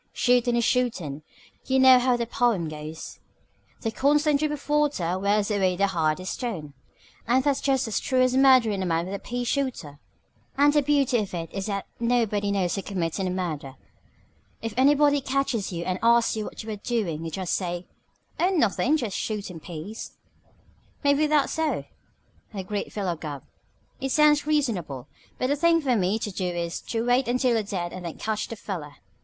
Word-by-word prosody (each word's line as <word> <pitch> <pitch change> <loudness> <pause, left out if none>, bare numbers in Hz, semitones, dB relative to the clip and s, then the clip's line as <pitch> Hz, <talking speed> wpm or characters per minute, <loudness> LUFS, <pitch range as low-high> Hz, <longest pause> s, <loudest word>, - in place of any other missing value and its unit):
Shootin' 245 -1 +2
is 235 - +2
shootin'. 195 - 0 0.5
You 265 - +2
know 260 -1 +8
how 250 0 +2
that 235 -1 -4
pome 225 -9 +1
goes 155 +1 -8 0.6
'The 225 - -1
constant 290 +3 +2
drip 305 0 0
of 295 -2 -6
water 290 - +1
Wears 205 +2 +1
away 190 -3 +2
the 200 +2 +2
hardest 175 -1 -1
stone 175 - -5 0.3
' - - -28
and 255 +3 +3
that's 285 -2 +1
just 270 -3 +1
as 220 - 0
true 255 -1 +2
of 255 0 +2
murderin' 255 -7 +5
a - - -1
man 165 0 0
with 190 - -6
a 200 - -3
pea 245 +4 -4
shooter. 245 - -2 0.6
"And 290 +1 +5
the 295 - +4
beauty 275 -4 +2
of 205 -3 -3
it 165 -1 -5
is 195 +1 -3
that 200 -2 -3
nobody 230 -4 +1
knows 190 -3 0
you're 195 - -3
committin' 185 0 -2
a - - -1
murder. 160 -7 -4 0.8
If 225 -1 -5
anybody 285 +2 +4
catches 265 -7 -1
you 170 -1 -4
and 185 +1 -2
asks 235 0 +4
you 215 -1 -3
what - - -8
you're 215 -1 -5
doin' 200 -8 -2
you 165 - -4
just 180 +2 -3
say, 175 -1 -2 0.5
'Oh, 360 - +3
nothin'. 300 - +2
Just 230 -9 -3
shootin' 200 -6 -4
peas.'" 175 +7 -8 0.9
"Maybe 285 +2 +3
that's 300 -2 +2
so," 320 -2 -1 0.7
agreed 200 +1 -4
Philo 190 -5 -2
Gubb. 150 -4 -7 0.6
"It 270 0 -2
sounds 300 +1 +4
reasonable. 200 - -1 0.3
But - - -1
the 285 - +2
thing 335 +2 +3
for 265 -6 +1
me 195 0 +1
to 215 -2 -4
do 185 -1 -2
is 170 -1 -3
to 230 0 -1
wait 245 +1 +2
until 250 +1 +2
you're 225 - +2
dead 185 -4 -4
and 185 - -7
then 170 -2 -6
catch 215 -1 -2
the 230 - -6
feller. 165 -9 -6
220 Hz, 185 wpm, -25 LUFS, 180-265 Hz, 0.9 s, know